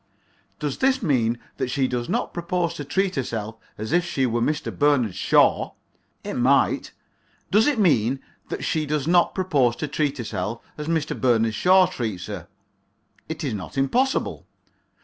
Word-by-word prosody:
Does 145 -3 -3
this 265 -2 +2
mean 120 - +2 0.2
that 125 - -2
she 130 +1 +1
does 120 -1 -3
not - - -1
propose 170 0 -1
to 150 - -6
treat 190 +6 0
herself 115 -4 -3 0.2
as 110 +1 -5
if 175 +1 +3
she 140 -7 0
were 120 -1 0
Mr. 150 +5 -1
Bernard 140 -8 +2
Shaw? - - +3 0.5
It - - -4
might. - - +2 0.6
Does 215 +5 +5
it 295 - +2
mean 135 - +3 0.3
that - - -4
she 155 -2 -1
does 150 -1 -1
not 175 0 +3
propose 145 -11 +2
to 150 - -3
treat 145 -1 -1
herself 110 -2 -3 0.2
as 150 0 -6
Mr. 160 -2 0
Bernard 115 -3 +2
Shaw 185 - +5
treats 110 - -4
her? - - -7 0.8
It 160 +1 -4
is 135 -6 -1
not 100 +5 -6
impossible. 250 - 0
140 Hz, 165 wpm, -24 LUFS, 120-170 Hz, 0.8 s, Does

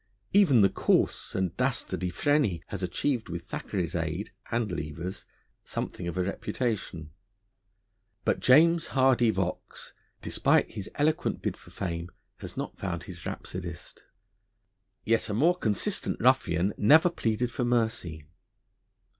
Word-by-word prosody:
Even 170 - +6
the 95 - +6
coarse - - +1
and 95 -3 -1
dastardly 90 - 0
Freney 110 - +1
has 100 - -4
achieved, 110 +6 -1
with 85 0 -5
Thackeray's 90 -2 -3
aid 85 +3 -3 0.2
(and 115 -4 -1
Lever's) 85 +3 -5 0.4
something 90 - -4
of 85 - -4
a 90 - +2
reputation. 100 -5 -3 1.1
But - - +2
James 165 +5 +5
Hardy 130 -3 +4
Vaux, 95 -4 -3 0.3
despite - - +2
his 100 0 -6
eloquent 155 +2 0
bid - - -1
for - - -17
fame, 85 -2 -4 0.3
has - - -9
not - - -5
found - - -3
his - - -8
rhapsodist. 85 -3 -7 1.0
Yet 115 +1 +1
a 105 - -1
more 165 +10 +4
consistent 110 - -1
ruffian 85 +4 +3
never 160 +11 +6
pleaded 120 -3 -1
for 125 - -2
mercy. 110 -10 -1
100 Hz, 130 wpm, -28 LUFS, 85-125 Hz, 1.1 s, Even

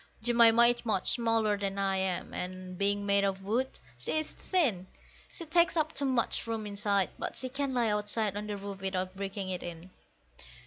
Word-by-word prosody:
Jemima 235 0 +6
is 240 0 +2
much 215 -5 +1
smaller 225 -3 +2
than 200 -1 -2
I 195 -1 +1
am, 185 -1 -1
and, 185 0 -5
being 200 +2 0
made 200 0 +3
of 195 -1 -1
wood, 240 +7 -1 0.2
she 125 - -1
is 310 - -1
thin; 240 - 0 0.4
She 335 - -7
takes 340 +2 +3
up 315 0 0
too 280 - +2
much 255 -3 +1
room 225 -2 -3
inside, 200 -2 0
but - - -4
she 260 - -2
can 270 0 -2
lie 235 -2 +2
outside 210 0 -1
on 210 +1 -4
the 205 -1 -4
roof 200 -1 -7
without 185 -1 -2
breaking 195 0 -4
it 180 - -3
in. 175 +1 -8
205 Hz, 190 wpm, -30 LUFS, 195-235 Hz, 0.4 s, Jemima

